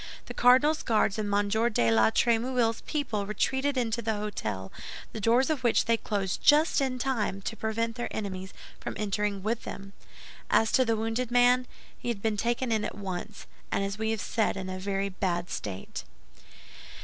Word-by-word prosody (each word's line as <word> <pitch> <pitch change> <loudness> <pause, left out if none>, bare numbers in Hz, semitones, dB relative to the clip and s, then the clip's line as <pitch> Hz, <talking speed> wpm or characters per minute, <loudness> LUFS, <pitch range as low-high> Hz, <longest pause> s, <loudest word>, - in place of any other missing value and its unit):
The - - -7
cardinal's 275 +6 +5
Guards 215 -3 +1
and 205 -1 -2
M. 205 0 +2
de 220 - +2
la 110 -1 +5
Trémouille's 235 - +1
people 220 -10 -2
retreated 265 +6 0
into 235 -2 0
the 220 0 0
hôtel, 205 - -4 0.4
the 220 - -5
doors 240 +7 +3
of 280 -5 -2
which 235 - +3
they 230 - +3
closed 200 -4 -2
just 300 0 +5
in 260 -2 0
time 240 -7 -1
to 225 - -3
prevent 225 +1 -2
their 240 - -2
enemies 190 -3 -5 0.3
from - - -5
entering 205 -1 -1
with 230 +2 -1
them. 195 0 -8 0.6
As 225 - +3
to 260 - +4
the 225 -1 +1
wounded 225 +2 -1
man, 245 +1 +4 0.3
he - - -7
had 235 -4 -1
been 220 -1 +1
taken 235 +3 -1
in 220 -1 +1
at - - -4
once, 200 +1 -6 0.3
and, 195 - +1
as 200 +1 -3
we 220 0 0
have 225 -1 -1
said, 220 -3 0
in 190 -1 -5
a 185 - -5
very 195 +1 -1
bad 180 -2 -2
state. 95 -2 -5
220 Hz, 185 wpm, -28 LUFS, 200-240 Hz, 0.6 s, cardinal's